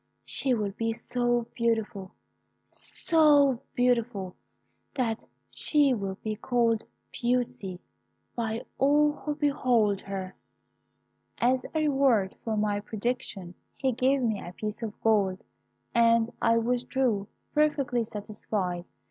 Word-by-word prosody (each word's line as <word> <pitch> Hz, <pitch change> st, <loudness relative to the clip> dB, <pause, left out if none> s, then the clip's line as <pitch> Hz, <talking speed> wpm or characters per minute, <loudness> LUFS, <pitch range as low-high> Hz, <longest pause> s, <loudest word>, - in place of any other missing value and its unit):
She 260 Hz, -2 st, 0 dB
will 210 Hz, -3 st, -1 dB
be 225 Hz, +3 st, -2 dB
so 240 Hz, 0 st, 0 dB
beautiful 225 Hz, -4 st, -1 dB, 0.6 s
so 290 Hz, -6 st, +3 dB, 0.2 s
beautiful, 235 Hz, -6 st, +1 dB, 0.6 s
that 230 Hz, -4 st, -1 dB, 0.3 s
she 290 Hz, -3 st, +2 dB
will 195 Hz, -4 st, -3 dB
be 215 Hz, -1 st, -2 dB
called 230 Hz, -1 st, +1 dB, 0.3 s
Beauty 240 Hz, -7 st, -1 dB, 0.6 s
by 225 Hz, -1 st, -2 dB
all 295 Hz, +2 st, +4 dB
who 295 Hz, 0 st, -4 dB
behold 250 Hz, -9 st, +2 dB
her.' 190 Hz, -1 st, -5 dB, 1.0 s
As 255 Hz, +2 st, +2 dB
a 315 Hz, -, +2 dB
reward 270 Hz, -10 st, +2 dB
for 220 Hz, -2 st, -1 dB
my 210 Hz, -1 st, +1 dB
prediction, 210 Hz, -4 st, -3 dB, 0.2 s
he 265 Hz, -1 st, 0 dB
gave 260 Hz, +2 st, +2 dB
me 220 Hz, -4 st, 0 dB
a 175 Hz, -, -8 dB
piece 210 Hz, +3 st, -5 dB
of 220 Hz, -2 st, -5 dB
gold, 200 Hz, -4 st, +2 dB, 0.5 s
and 230 Hz, 0 st, +4 dB
I 230 Hz, 0 st, +4 dB
withdrew, 240 Hz, -2 st, 0 dB, 0.3 s
perfectly 285 Hz, -5 st, +2 dB
satisfied. 205 Hz, -4 st, -3 dB
230 Hz, 115 wpm, -28 LUFS, 210-255 Hz, 1.0 s, all